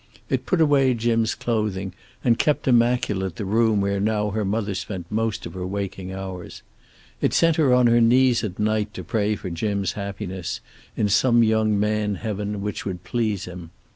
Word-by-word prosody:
It - - -1
put 185 - +1
away 140 -5 +4
Jim's 115 -1 +1
clothing, 105 -5 -2 0.3
and 120 -3 +3
kept 150 -2 +1
immaculate 115 -7 +2
the 105 - -4
room 110 +1 +2
where 100 0 0
now 105 0 0
her 110 +1 -1
mother 105 +1 -1
spent 95 -1 -5
most 110 0 -1
of - - -7
her 95 -1 -5
waking 95 -1 -4
hours. 95 -2 -7 0.6
It - - +1
sent 165 -1 +4
her 150 -5 +3
on 125 0 +5
her 120 0 +5
knees 125 +1 +4
at 95 -4 -4
night 105 0 0
to - - -6
pray 105 -2 0
for 95 -3 -6
Jim's 100 +1 -1
happiness 95 -2 -5 0.4
in 105 - +2
some 120 +3 +4
young 110 -2 +2
man 105 0 0
heaven 105 -1 -4
which 105 0 -3
would 90 -2 -5
please 105 -1 -1
him. 90 -2 -9
105 Hz, 180 wpm, -23 LUFS, 100-115 Hz, 0.6 s, on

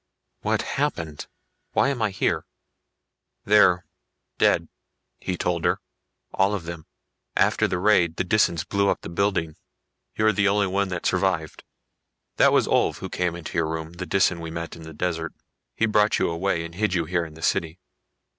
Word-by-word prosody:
"What - - 0
happened? 80 -3 -3 0.5
Why 135 - +3
am 135 -4 -2
I 110 - +2
here?" 85 -4 -1 1.0
"They're... 95 -3 +5 0.5
dead," - - +3 0.5
he 90 - -3
told 85 -1 -1
her. - - +2 0.5
"All 100 +2 +2
of 95 - -5
them. 85 -1 -8 0.5
After - - +3
the 90 - -1
raid 90 -4 +3
the - - 0
Disans 85 -5 +2
blew 100 0 +2
up - - 0
the - - -7
building. 85 -3 -1 0.6
You're 110 0 +3
the 100 +1 +2
only 100 +1 +3
one 100 +1 0
that 90 -2 -5
survived. 90 -4 0 0.7
That - - +6
was - - +4
Ulv - - +2
who - - -6
came 90 -1 -1
into 85 0 -4
your 80 - +1
room, 80 0 -4
the 90 +1 -6
Disan 95 -3 +2
we 85 -1 -6
met 85 0 -5
in 85 - -12
the 80 0 -9
desert. 80 -1 -2 0.4
He 115 - +2
brought 105 -1 +3
you - - +1
away 85 0 -1
and 85 - -9
hid 100 +1 0
you 85 -2 +1
here 85 +1 0
in 80 -2 -9
the 80 - -11
city." 80 +2 0
90 Hz, 180 wpm, -24 LUFS, 85-100 Hz, 1.0 s, That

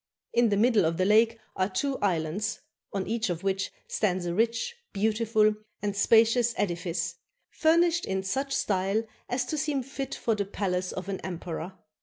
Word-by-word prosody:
In 235 -1 +4
the 200 - +2
middle 225 -2 +4
of 165 0 +1
the 185 - +2
lake 225 +3 +4 0.2
are 185 +1 +1
two 265 +8 -1
islands, 185 +3 -1 0.3
on 195 -1 -2
each 225 -2 -1
of 175 0 -3
which 195 0 0 0.2
stands 185 -4 0
a 170 - -1
rich, 230 - +1 0.2
beautiful, 215 +1 +2 0.3
and 205 -1 -2
spacious 230 +3 +4
edifice, 170 -2 -2 0.3
furnished 335 +2 +3
in 190 0 -1
such 270 +8 -2
style 195 -2 +1 0.3
as 245 +1 0
to 310 - -2
seem 290 -3 0
fit 275 +1 -5
for 230 - 0
the 205 -1 0
palace 185 -2 -2
of 185 0 -6
an 195 -1 -3
emperor. 175 0 -5
205 Hz, 170 wpm, -28 LUFS, 185-235 Hz, 0.3 s, In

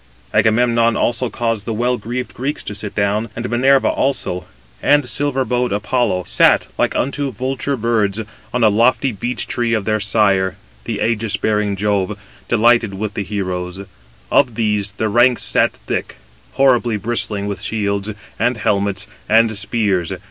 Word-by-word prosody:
Agamemnon 115 0 +3
also 120 +1 0
caused 115 -4 -2
the 115 - -2
well 120 +3 +1
greaved 125 +2 -5
Greeks 135 +4 -3
to - - -5
sit 105 0 -6
down; 105 +2 0
and 120 +1 -3
Minerva 135 +3 +4
also, 110 -10 -1 0.4
and 145 -3 +3
silver 135 +2 0
bowed 125 -1 0
Apollo, 105 -2 0
sat - - +4
like - - 0
unto 140 +1 -1
vulture 130 +4 -2
birds, 110 -3 0 0.3
on 125 -1 0
a 110 - +6
lofty 120 +5 +2
beech 120 +4 -3
tree 120 -1 0
of 105 -3 -2
their 110 0 +1
sire, 100 -3 +2 0.3
the - - -3
ægis 110 -2 0
bearing 105 -2 0
Jove, 105 0 0 0.3
delighted 115 -2 +3
with 105 +1 -4
the - - -3
heroes; 95 -1 -4 0.5
of 120 -3 +3
these 105 -3 0
the 110 +1 -1
ranks 120 +3 +3
sat - - +2
thick, - - -4 0.4
horribly 125 -4 +3
bristling 105 -2 -1
with 100 -3 -4
shields, 100 -1 -1 0.3
and 120 +2 +1
helmets, 100 -2 0 0.2
and 110 0 +4
spears. 100 -4 0
110 Hz, 155 wpm, -18 LUFS, 100-120 Hz, 0.5 s, a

